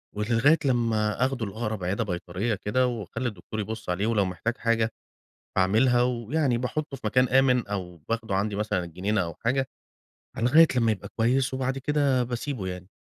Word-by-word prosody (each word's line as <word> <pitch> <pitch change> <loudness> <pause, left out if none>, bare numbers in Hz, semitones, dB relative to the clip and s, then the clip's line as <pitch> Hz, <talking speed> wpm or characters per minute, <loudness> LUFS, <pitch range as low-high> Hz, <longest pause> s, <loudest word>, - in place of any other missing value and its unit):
ولغاية 115 +9 +3
لما 115 -3 +1
آخُده 130 -4 -2
لأقرب 105 -1 -4
عيادة 100 +6 0
بيطريّة 90 +3 -2
كده، 115 +5 +1
وأخلّي 120 +1 -3
الدكتور 110 +1 -6
يبُص 110 -1 -5
عليه 95 +4 0
ولو 110 -4 +2
محتاج 95 +7 -3
حاجة 115 -1 +1 0.6
باعملها، 115 +7 +3
ويعني 125 +2 0
باحُطُّه 140 +4 -3
في - - -24
مكان 125 +4 +3
آمِن 125 -3 +3
أو 90 -4 -5
باخده 115 -4 -1
عندي 100 +1 0
مثلًا 105 -3 -1
الجنينة 95 +5 -1
أو 85 -1 -4
حاجة، 130 +2 +1 0.7
أ - - -3
لغاية 155 +7 +6
لمّا 115 -3 +3
يبقى 105 - -4
كويس 130 +3 +1
وبعد 130 +1 -1
كده 140 -2 +1
باسيبه 120 -3 -4
يعني، 90 0 -6
115 Hz, 165 wpm, -26 LUFS, 105-125 Hz, 0.7 s, لغاية